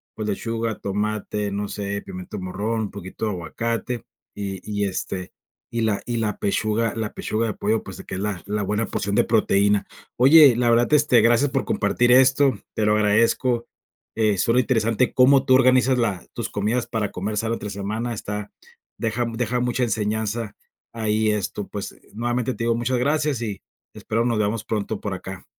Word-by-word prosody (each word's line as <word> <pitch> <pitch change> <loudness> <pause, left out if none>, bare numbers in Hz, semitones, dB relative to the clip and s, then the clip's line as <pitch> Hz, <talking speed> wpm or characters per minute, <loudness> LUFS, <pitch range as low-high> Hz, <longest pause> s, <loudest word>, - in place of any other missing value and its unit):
pues, 110 -1 -3
lechuga, 115 +2 -2
tomate, 105 0 -2
no 100 +1 -2
sé, 100 0 -4
pimiento 95 +2 -7
morrón, 100 +5 -2
un 105 - -5
poquito 95 +2 -6
de 105 - 0
aguacate 115 +6 -3 0.3
y 100 -2 -5
y, 105 -1 -2
este, 95 -1 -4 0.4
y 115 0 -2
la 110 -3 0
y 120 -1 -2
la 105 -2 -1
pechuga 110 +2 0
la 110 -2 -3
pechuga 115 +1 -2
de 105 - -2
pollo, 110 +3 0
pues, 95 - -9
de - - -10
que - - -6
es 95 - -3
la 100 -4 -2
la 105 +1 -2
buena 105 +3 0
porción 100 +1 -3
de - - +3
proteína. 100 -2 +2 0.3
Oye, 140 0 +8
la 120 0 +2
verdad, 120 +1 +4
este, 145 -5 +5
gracias 120 +5 +3
por - - 0
compartir 120 +4 +2
esto, 130 -1 +5 0.2
te 110 - +1
lo 105 0 +3
agradezco. 115 +3 +2 0.5
Eh 105 -3 +2
,suena 115 +6 +3
interesante 115 0 +1
cómo 135 +1 +5
tú 130 - +4
organizas 130 0 +4
la 105 -7 -1
tus - - -3
comidas 110 +4 -1
para 105 -3 -2
comer 105 +3 -3
sano 115 +2 0
entre 105 - -6
semana, 110 +4 -3
está 105 -1 -5 0.4
deja 115 +2 -1
deja 125 +1 -1
mucha 125 +1 0
enseñanza 110 0 -2 0.4
ahí, 110 0 +1
esto, 105 -1 -3
pues, 100 -2 -6 0.2
nuevamente 120 +3 -1
te 115 - -5
digo, 115 0 +2
muchas 120 +2 0
gracias 145 -1 +1
y 105 -4 -4 0.3
espero 115 +2 -1
nos 120 -2 +1
veamos 105 +1 0
pronto 110 -1 -3
por 100 - -3
acá. 95 0 -7
110 Hz, 185 wpm, -23 LUFS, 105-120 Hz, 0.5 s, Oye